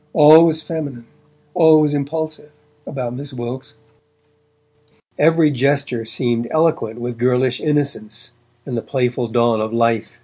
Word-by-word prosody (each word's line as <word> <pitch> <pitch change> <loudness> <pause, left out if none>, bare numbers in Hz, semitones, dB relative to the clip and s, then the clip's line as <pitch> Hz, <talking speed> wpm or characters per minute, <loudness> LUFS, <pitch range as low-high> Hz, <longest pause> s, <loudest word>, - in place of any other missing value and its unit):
All 155 +2 +7
was 160 -1 -1
feminine, 145 -7 -6 0.5
all 160 -2 +5
was 150 -1 +1
impulsive, 155 +1 -4 0.4
about 125 -4 -5
Miss 140 +2 -8
Wilkes; 125 +1 -7 1.4
every 160 0 +4
gesture 140 -3 -1
seemed 120 +1 -2
eloquent 155 -8 0
with 120 -1 -6
girlish 125 0 +1
innocence 115 -7 -3 0.3
and 130 - -5
the 115 - -2
playful 125 -2 -2
dawn 115 -1 +1
of 110 0 -3
life. 115 0 -1
130 Hz, 130 wpm, -18 LUFS, 120-150 Hz, 1.4 s, All